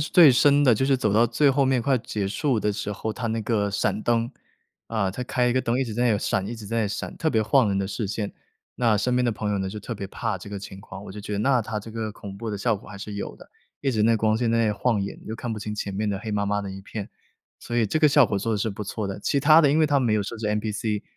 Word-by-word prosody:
最 155 -1 +7
深 145 +3 +5
的， 120 -4 +6
就 130 - 0
是 135 -1 +3
走 105 -5 0
到 115 +3 +5
最 135 +5 +3
后 135 0 +2
面 130 -3 +2
快 130 -1 +2
结 110 -4 -3
束 125 +4 0
的 105 0 0
时 105 0 -4
候， 110 +1 -3
它 120 0 -4
那 110 0 -1
个 105 -2 0
闪 105 +1 -1
灯， 115 0 +1 0.5
啊， 110 -4 -1
它 125 - -5
开 125 0 +1
一 - - +2
个 130 - +2
灯， 120 +1 0
一 135 - +1
直 115 - -5
在 120 +3 0
那 115 - +4
里 100 - 0
闪 95 0 -1
一 115 +2 -5
直 110 - -9
在 115 +2 -1
那 - - +2
里 - - -1
闪， - - -5
特 160 - +1
别 110 -6 +2
晃 125 0 +3
人 100 0 0
的 95 - -1
视 105 +2 -3
线， 105 0 -3 0.4
那 115 -3 +3
身 125 +4 0
边 125 - +2
的 120 - +2
朋 105 -1 -3
友 100 - 0
呢， 95 0 -2
就 105 +2 -6
特 115 +3 -6
别 100 -1 -5
怕 105 -1 -3
这 100 - -10
个 100 -1 -5
情 95 0 -9
况， 100 0 -10
我 95 - -9
就 105 - -8
觉 105 +1 -5
得 - - -2
那 130 0 +3
它 110 0 -3
这 110 +2 -9
个 110 -1 -4
恐 100 -1 -9
怖 115 0 -5
的 105 - -3
效 115 +2 +1
果 100 - -10
还 105 - -9
是 105 +1 -7
有 100 - -5
的， - - -15 0.4
一 135 - +1
直 110 -3 +1
那 115 +1 +4
光 110 0 +2
线 115 0 0
在 115 - +2
那 105 - +2
晃 115 +1 +1
眼， 100 - -5
就 110 - -5
看 120 -1 -4
不 110 - -4
清 105 0 -5
前 100 -1 -4
面 105 +2 -1
的 100 -1 -1
黑 110 +1 -6
麻 100 -1 0
麻 105 0 0
的 100 - -5
一 95 0 -8
片。 100 +1 -7 0.5
所 120 - -4
以 115 - +3
这 155 - 0
个 155 -2 +5
效 145 -2 +6
果 100 -3 -1
做 115 +3 -1
得 - - +1
是 110 +1 -1
不 105 +2 -6
错 105 +1 -4
的， 100 +1 -5
其 140 - +1
他 155 +3 +7
的 145 -3 +4
因 150 - +3
为 155 - +4
它 145 -2 +2
没 115 -4 +2
有 105 - +1
设 105 +4 -6
置 110 - -3
NPC， 105 0 -1
110 Hz, 355 characters per minute, -25 LUFS, 105-125 Hz, 0.5 s, 最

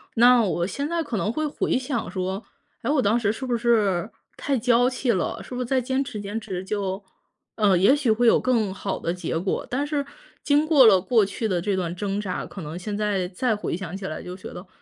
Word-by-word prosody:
那 245 0 +6
我 175 -3 0
现 280 +7 -3
在 340 0 0
可 280 -7 -4
能 210 - 0
会 310 +5 -1
回 290 - 0
想 255 -2 -3
说， 190 +2 -3 0.4
诶， 235 - -3
我 290 -2 +3
当 215 +1 +2
时 205 -3 +1
是 245 +5 -5
不 245 -2 0
是 215 -5 +2 0.3
太 275 -2 -1
娇 245 +1 +3
气 250 -1 0
了， 185 -6 -1
是 250 - -8
不 250 - -2
是 - - -1
再 260 +2 +1
坚 260 +2 0
持 245 -6 -7
坚 205 +2 -4
持 185 -3 -5
就 195 -1 -2 0.5
呃， 205 -4 +3
也 195 +10 +5
许 285 -6 +1
会 235 +2 +3
有 - - +6
更 225 -6 +1
好 195 0 -4
的 170 - -2
结 170 -2 -3
果。 185 +2 -2
但 280 +4 -1
是 290 -2 -1 0.4
经 295 +1 +3
过 295 -5 +7
了 200 -4 +7
过 210 +3 +3
去 200 +3 -3
的 180 -4 0
这 195 +1 -1
段 175 -2 -2
挣 200 +1 -2
扎， 200 -3 -3
可 195 - -9
能 155 +1 -6
现 205 +3 -4
在 200 -4 0
再 220 +5 0
回 205 -5 -3
想 185 -1 -6
起 195 - -7
来 155 - -5
就 180 - -7
觉 185 - -9
得， 180 - -9
215 Hz, 260 characters per minute, -24 LUFS, 190-250 Hz, 0.5 s, 过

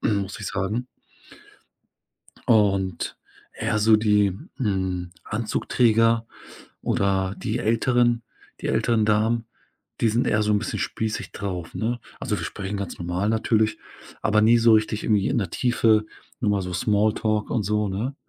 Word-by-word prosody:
muss 100 0 -1
ich 105 - -5
sagen. 105 +6 -2 1.6
Und 100 -5 +2 0.4
eher 105 - -1
so 110 +1 +6
die, 105 -3 +2 0.2
hm, 95 -7 -2
Anzugträger 115 +1 +1 0.6
oder 95 -1 0
die - - -2
älteren 120 +1 +2 0.4
die - - -2
älteren 115 -2 +2
Damen. 110 +2 +2 0.6
Die 115 - +3
sind 115 +3 +1
eher 105 0 +2
so 105 - 0
'n 105 - +3
bisschen - - -4
spießig 110 -1 -3
drauf, 90 -4 -5
ne? 120 +2 -2 0.2
Also, - - -2
wir - - -4
sprechen 100 +1 -5
ganz 100 -3 -5
normal 90 +4 -1
natürlich, 110 0 +1 0.4
aber 105 -1 +3
nie 115 +2 +5
so 115 0 +5
richtig 110 0 +2
irgendwie 105 -3 +2
in - - 0
der 100 -6 -2
Tiefe. 110 -2 +2 0.3
Nur 110 - +1
mal 100 -2 +1
so 90 0 -5
Small 105 +4 +2
Talk 110 -1 -1
und 115 -3 0
so, 105 +1 0
ne? 110 +8 -3
105 Hz, 150 wpm, -24 LUFS, 100-115 Hz, 1.6 s, so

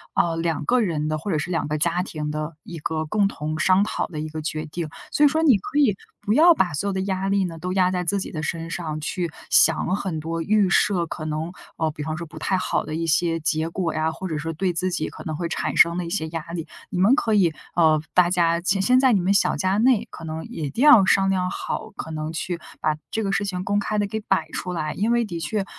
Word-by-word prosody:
呃， 170 -1 +2
两 165 -3 -1
个 250 +7 +3
人 160 -7 -1
的， 155 0 -1
或 180 +6 -4
者 160 - +1
是 150 +4 -3
两 165 - -1
个 150 +1 -1
家 170 +3 +1
庭 150 -5 -4
的 155 +1 -4
一 170 - -8
个 155 +1 -2
共 200 +5 +2
同 155 -4 -4
商 185 +4 +4
讨 215 - -2
的 155 -3 -7
一 155 +1 -4
个 155 0 -5
决 155 0 -3
定， 160 +1 -5 0.2
所 295 - +2
以 - - +7
说 315 +3 0
你 270 -9 +6
可 285 +10 -5
以 245 -9 +4 0.3
不 205 - 0
要 335 +7 +7
把 185 - +1
所 175 +7 -2
有 200 - -1
的 190 - -1
压 190 0 -1
力 195 -1 +2
呢， 165 -2 -6
都 180 +3 -4
压 185 -1 +3
在 180 -1 -1
自 200 +3 0
己 - - -5
的 155 - -4
身 165 +1 -3
上， 155 -2 -4
去 170 +2 -3 0.2
想 185 - +4
很 185 -5 -3
多 165 +2 -3
预 205 +2 +2
设， 180 -2 +3
可 160 -1 -7
能， 155 +2 -3 0.3
呃， 160 -1 0
比 150 - -9
方 155 +1 -3
说 170 - -5
不 160 - -11
太 190 - 0
好 185 - -1
的 155 - -5
一 165 +1 -2
些 165 +1 +1
结 155 +1 0
果 170 -1 -2
呀， 155 +1 0
或 185 +3 -6
者 160 - -3
说 165 +2 -3
对 180 +3 -1
自 185 +3 0
己 155 - -1
可 - - -11
能 155 - -3
会 170 +2 -3
产 - - -3
生 170 +1 +5
的 180 - -2
一 - - -5
些 160 -2 -2
压 165 -1 -4
力。 165 -2 -4 0.2
你 - - -4
们 200 +7 +5
可 225 -6 0
以 180 -6 +3 0.2
呃， 155 -3 +4
大 180 -1 +5
家 170 -2 +2
其 190 +2 +1
先 250 +6 +4
在 260 -2 +4
你 200 - +3
们 185 +2 +2
小 - - +3
家 190 +1 0
内， 235 0 +3
可 - - -11
能 160 0 -5
也 160 - -5
一 - - -3
定 235 - -1
要 250 -10 +8
商 195 0 +3
量 185 -1 0
好， - - -4
可 - - -6
能 155 0 -4
去 170 +1 -3 0.2
把 155 - +1 0.2
这 220 - -1
个 195 - -1
事 200 +1 0
情 185 -2 -3
公 200 +2 0
开 210 +1 -1
地 205 - 0
给 220 +2 -3
摆 190 -6 0
出 180 - -4
来。 155 -3 -2
因 215 +4 0
为 235 0 +2
的 170 -5 -5
确， 205 +4 -1
175 Hz, 295 characters per minute, -23 LUFS, 160-195 Hz, 0.3 s, 要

